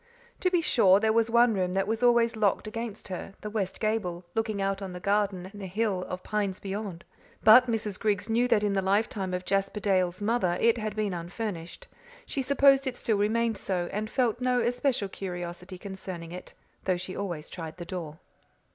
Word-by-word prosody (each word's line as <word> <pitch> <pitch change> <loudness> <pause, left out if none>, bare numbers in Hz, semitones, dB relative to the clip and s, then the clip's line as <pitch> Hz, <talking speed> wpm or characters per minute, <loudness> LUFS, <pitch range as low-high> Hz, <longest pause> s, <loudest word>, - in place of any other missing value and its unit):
To 365 - +2
be 355 -2 +2
sure, 200 - +5
there 220 +1 +2
was 230 0 +3
one 235 0 +5
room 180 -2 0
that 195 0 +1
was 225 +2 -1
always 235 -1 +4
locked 215 -1 +1
against 220 -1 -6
her, 190 +1 -6
the 210 - -5
west 200 -4 -2
gable, 195 -5 -1
looking 220 -2 -1
out 195 0 -1
on 190 -2 -5
the 180 - -6
garden 200 -1 0
and 205 - -9
the 190 - -5
hill 190 -1 -1
of 185 0 -5
pines 205 -2 -1
beyond. 195 -3 -5 0.4
But 245 +4 +8
Mrs. 215 -4 -2
Griggs 205 -1 0
knew 235 +2 +2
that 210 -4 +3
in 205 -1 +1
the 195 - +1
lifetime 195 0 0
of 180 0 -3
Jasper 195 +1 0
Dale's 185 -3 +1
mother 205 -5 +1
it 230 0 +3
had 215 -1 -3
been 210 -3 -1
unfurnished. 175 - -5 0.4
She 275 - -2
supposed 275 0 +4
it 255 - -2
still 220 -4 0
remained 225 +1 +1
so, 180 -2 -2
and 215 +1 -2
felt 240 -1 0
no 250 0 +2
especial 245 -2 0
curiosity 180 -1 -6
concerning 185 -3 -7
it, 180 +1 -9 0.3
though 185 -2 +2
she 185 +1 -6
always 175 -6 -4
tried 165 -2 -7
the 175 - -7
door. 165 -4 -6
205 Hz, 200 wpm, -28 LUFS, 185-225 Hz, 0.4 s, But